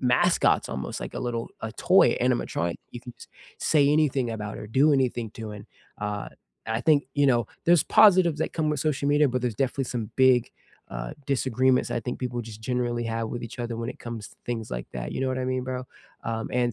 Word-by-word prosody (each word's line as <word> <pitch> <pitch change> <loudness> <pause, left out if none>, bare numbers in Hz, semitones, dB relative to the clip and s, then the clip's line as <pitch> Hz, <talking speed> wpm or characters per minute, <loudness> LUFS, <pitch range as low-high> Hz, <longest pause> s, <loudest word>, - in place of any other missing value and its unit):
mascots 125 -1 +3
almost, 65 - -4
like - - -6
a - - -3
little 115 -1 -2
a 110 - -4 0.2
toy 190 - +8 0.2
animatronic, 120 -9 0 0.2
you 120 - -6
can 125 - -8
just - - -13 0.4
say 150 -2 +5
anything 140 -5 +2
about 105 -2 -5
it - - -8
or - - -7
do 150 - +7
anything 125 -4 +1
to 115 - -6
in. 100 - -9 0.4
Uh, 105 0 -4 0.4
I 115 +1 -1
think, 155 -2 +6 0.2
you 140 - +5
know, 120 - +3 0.2
there's 170 -2 +5 0.2
positives 185 -7 +6
that - - -1
come 155 -1 +1
with 150 -3 -1
social 140 -1 -1
media, 145 0 +4
but 125 0 -1
there's 120 -3 -1
definitely 135 +1 -2
some 110 -3 -3
big, 130 -2 +4 0.4
uh, - - -4 0.2
disagreements 130 0 +2
I - - -1
think 125 +2 -4
people 120 -1 -3
just 110 -1 -10
generally 120 0 -1
have 115 0 -2
with 120 - -4
each 115 +1 -8
other 120 -1 -3
when 115 +1 -3
it - - -23
comes 115 -3 -6
to - - -21
things 115 -2 -3
like - - -5
that. - - -5
You - - -3
know 135 - +1
what 130 0 -1
I 130 - -2
mean, 130 0 -1
bro? 130 0 -4 0.4
Um, 115 0 -3
and 120 -1 +1
125 Hz, 225 wpm, -26 LUFS, 115-130 Hz, 0.4 s, toy